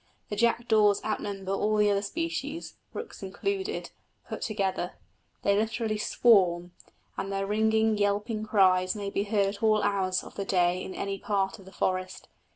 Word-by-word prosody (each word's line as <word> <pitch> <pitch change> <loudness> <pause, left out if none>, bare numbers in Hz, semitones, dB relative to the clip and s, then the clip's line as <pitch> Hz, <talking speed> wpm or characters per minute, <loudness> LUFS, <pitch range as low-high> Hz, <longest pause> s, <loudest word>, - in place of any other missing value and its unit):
The 205 - -2
jackdaws 220 -2 +3
outnumber 200 -3 -3
all 210 +2 +1
the 210 -1 +4
other 200 0 +1
species 325 +6 -4 0.2
(rooks 460 - -7
included) 390 - -3 0.4
put - - -6
together; 195 -4 -1 0.5
they 200 - +3
literally 220 0 -1
swarm, 180 -7 +3 0.5
and 195 - -3
their 195 0 -1
ringing, 220 +1 +2
yelping 210 +2 0
cries 185 -3 +3
may 200 -1 -4
be 200 - -1
heard 205 -1 +2
at - - -20
all 215 -1 +3
hours 185 -2 +1
of - - -11
the 200 - -3
day 180 -1 +2
in 185 - -7
any 195 0 -3
part 195 0 -1
of 195 - -14
the 190 - -12
forest. 185 0 -2
205 Hz, 160 wpm, -28 LUFS, 195-220 Hz, 0.5 s, the